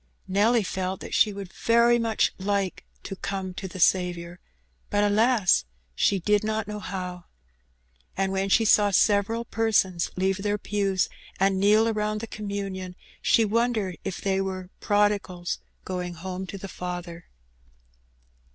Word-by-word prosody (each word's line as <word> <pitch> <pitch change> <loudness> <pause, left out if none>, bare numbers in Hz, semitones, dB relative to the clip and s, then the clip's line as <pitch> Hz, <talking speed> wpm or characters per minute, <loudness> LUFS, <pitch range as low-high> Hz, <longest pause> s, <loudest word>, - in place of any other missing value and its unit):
Nelly 215 +4 +3
felt 185 0 -3
that - - -7
she 215 - +4
would 195 -2 -8
very 235 +1 +4
much 225 -2 +1
like 195 -1 -1 0.2
to 195 - -6
'^come 190 -2 -4
to 190 - -5
the 185 0 -9
Saviour,'' 175 -1 +1 0.5
but, 205 0 +2
alas! 210 - +3 0.3
she 195 - +2
did 210 +3 +2
not 215 -1 -1
know 210 0 -5
how. 180 -2 -6 0.9
And 195 0 0
when 195 0 -1
she 225 +3 +4
saw 205 -1 +5
several 205 +3 +2
persons 210 -7 +1
leave 190 +1 +1
their 205 +1 0
pews 200 -2 0 0.3
and 195 0 +2
kneel 210 +3 +5
around 215 -1 -1
the 225 - -5
communion, 200 -4 -5 0.3
she 225 - +4
wondered 220 -4 0
if 195 - -4
they 195 -1 +1
were 185 -1 -5
"prodigals 205 -4 0 0.3
going 180 -1 -4
home 185 +2 -5
to 200 - -6
the 195 - -7
Father." 175 -2 -6
195 Hz, 145 wpm, -26 LUFS, 185-210 Hz, 0.9 s, saw